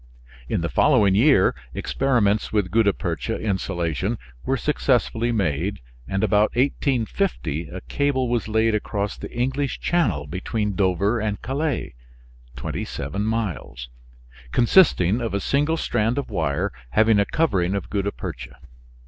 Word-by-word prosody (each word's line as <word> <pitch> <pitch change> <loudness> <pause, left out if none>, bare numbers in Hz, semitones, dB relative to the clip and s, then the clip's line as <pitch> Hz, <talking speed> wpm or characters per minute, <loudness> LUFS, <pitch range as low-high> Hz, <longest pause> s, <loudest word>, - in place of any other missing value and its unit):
In - - 0
the 85 - -1
following 110 - +4
year 115 -1 +5 0.2
experiments 115 -6 +1
with 100 -4 0
gutta 110 -1 +4
percha 95 +4 -3
insulation 85 - -1 0.3
were 135 - 0
successfully 120 -4 +1
made, 95 -2 -1 0.3
and 95 +2 -1
about 105 0 +3
1850 125 - 0
a 90 +1 -7
cable 140 -3 0
was 120 -2 -1
laid 110 +1 +2
across 105 -1 -2
the - - -8
English 130 +3 -1
Channel 115 - +1
between 100 +6 -2
Dover 100 +4 +1
and 105 -2 -2
Calais 140 +5 -2 0.6
(twenty - - -4
seven 75 +10 -4
miles), 90 - -3 0.6
consisting 120 - +4
of 115 -4 -2
a - - +1
single 145 +8 +1
strand 115 -4 0
of 140 - -3
wire 70 -4 -1 0.2
having 110 - +4
a 100 - +3
covering 100 - +1
of 100 - -5
gutta 100 0 0
percha. 65 -12 -7
105 Hz, 135 wpm, -23 LUFS, 95-125 Hz, 0.6 s, year